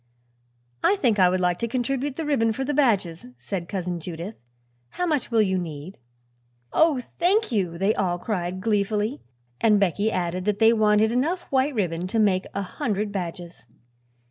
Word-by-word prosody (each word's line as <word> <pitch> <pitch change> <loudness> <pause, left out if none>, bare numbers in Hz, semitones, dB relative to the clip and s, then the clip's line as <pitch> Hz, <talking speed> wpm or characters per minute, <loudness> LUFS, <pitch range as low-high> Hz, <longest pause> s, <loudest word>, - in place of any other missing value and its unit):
"I 395 - +4
think 235 - +1
I 180 -1 +6
would 185 +1 0
like 180 -1 +1
to 235 - -1
contribute 260 +3 -2
the 325 - -4
ribbon 230 -7 +2
for 265 +4 -3
the 290 - -1
badges," 200 - +1
said 170 +9 -5
Cousin 180 -3 -3
Judith. 170 +5 -6 0.5
"How 360 - -2
much 300 -6 0
will 225 -2 +3
you 190 -2 0
need?" 160 +1 -7 0.7
"Oh, 315 -4 +4 0.2
thank 390 - +2
you!" 185 -7 -1
they 195 +4 +2
all 175 -4 0
cried 185 -2 -3
gleefully, 210 +4 0 0.4
and 210 -2 +4
Becky 200 +3 +1
added 180 -1 -2
that 210 -1 +1
they 225 +1 +5
wanted 215 0 +3
enough 310 +9 0
white 270 +1 +1
ribbon 180 -4 -1
to 225 - -2
make 195 -4 +2
a 200 - -1
hundred 210 -2 -2
badges. 175 - -6
210 Hz, 170 wpm, -24 LUFS, 180-245 Hz, 0.7 s, I